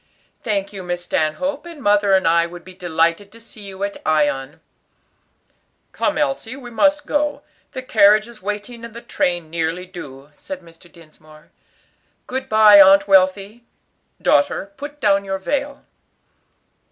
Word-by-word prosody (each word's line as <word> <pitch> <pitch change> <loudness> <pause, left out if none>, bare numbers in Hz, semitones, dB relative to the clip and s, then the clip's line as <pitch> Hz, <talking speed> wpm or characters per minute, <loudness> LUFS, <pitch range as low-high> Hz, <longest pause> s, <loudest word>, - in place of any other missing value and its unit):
"Thank 200 -3 -2
you, 195 - -7
Miss 175 -1 -4
Stanhope; 275 - -2
and 335 -3 -11
mother 205 -4 +2
and 190 -3 +3
I 170 +1 +3
would 175 0 -12
be 185 - -12
delighted 170 +2 -1
to 230 - -14
see 230 -1 -14
you 195 -1 -8
at 200 0 -4
Ion." 145 -3 0 1.3
"Come, 305 0 -1
Elsie, 270 -5 -2
we 250 -3 -11
must 290 +6 +2
go; 295 0 -1 0.3
the 260 - -6
carriage 215 -2 +4
is 235 -2 -15
waiting 210 +4 -6
and 230 -1 -10
the 235 - -8
train 175 -3 -2
nearly 165 +2 -2
due," 145 -6 -11
said 185 +5 -9
Mr. 170 0 -19
Dinsmore. 155 -2 -19 0.7
"Good 260 +1 -5
bye, 215 -2 +8
Aunt 195 +1 +6
Wealthy. 195 +4 +2 0.6
Daughter, 300 - +1
put 290 +1 -9
down 200 -4 +2
your 195 0 -3
veil." 280 +8 -4
200 Hz, 150 wpm, -20 LUFS, 175-235 Hz, 1.3 s, bye